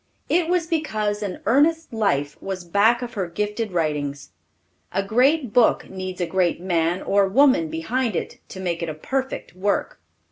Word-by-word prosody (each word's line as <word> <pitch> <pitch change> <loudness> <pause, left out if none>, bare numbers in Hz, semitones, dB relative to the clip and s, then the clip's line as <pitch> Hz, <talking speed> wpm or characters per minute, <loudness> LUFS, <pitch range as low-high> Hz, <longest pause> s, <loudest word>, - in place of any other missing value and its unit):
It 340 -1 +2
was 355 -2 +2
because 215 -11 -1
an 200 -3 -4
earnest 305 +5 +2
life 145 -10 0
was 190 -2 -4
back 210 +7 +3
of 245 0 -6
her 190 -3 -2
gifted 210 +4 -3
writings. 150 -4 -2 0.6
A 195 - 0
great 250 +4 +2
book 245 -2 +3
needs 185 -1 -6
a 175 - +1
great 175 0 +1
man 175 0 0
or 200 0 +3
woman 255 - +4
behind 225 +8 -1
it - - -4
to 190 - -8
make 175 -3 -2
it 170 - -2
a 155 - -5
perfect 265 - -4
work. 200 +2 -1
200 Hz, 170 wpm, -23 LUFS, 175-245 Hz, 0.6 s, woman